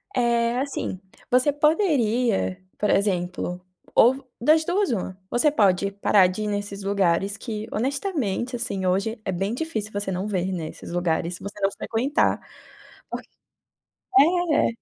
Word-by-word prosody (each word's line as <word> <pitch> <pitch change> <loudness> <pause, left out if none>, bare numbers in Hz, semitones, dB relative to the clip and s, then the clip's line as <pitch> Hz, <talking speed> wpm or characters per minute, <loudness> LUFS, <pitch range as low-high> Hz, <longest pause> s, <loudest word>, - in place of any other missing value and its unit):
É, 235 -1 +2
assim, 270 -8 -3 0.3
você 255 +4 +4
poderia, 255 - +1 0.2
por 210 - 0
exemplo, 180 -2 0 0.4
ou 260 +3 +4
das 310 +6 +4
duas, 380 +1 +1
uma: 190 -4 -3
"Você 290 +5 +3
pode 200 -6 +2
parar 200 -1 +4
de 185 +4 -3
ir - - -2
nesses 205 -1 -3
lugares 195 0 +1
que 220 -1 -5
honestamente, 260 - -1
assim, 200 -5 -2
hoje 200 +5 0
é 190 - -1
bem 195 +5 -1
difícil 245 -8 -3
você 205 -1 -2
não 185 +2 -2
ver, 190 -2 -1
né, 165 -4 -3
esses - - -10
lugares 175 0 0
se - - -12
você 200 +1 -7
não 195 0 +2
frequentar". 250 +9 0 0.7
Por - - -4 1.0
é, 340 0 +4
210 Hz, 145 wpm, -24 LUFS, 190-255 Hz, 1.0 s, você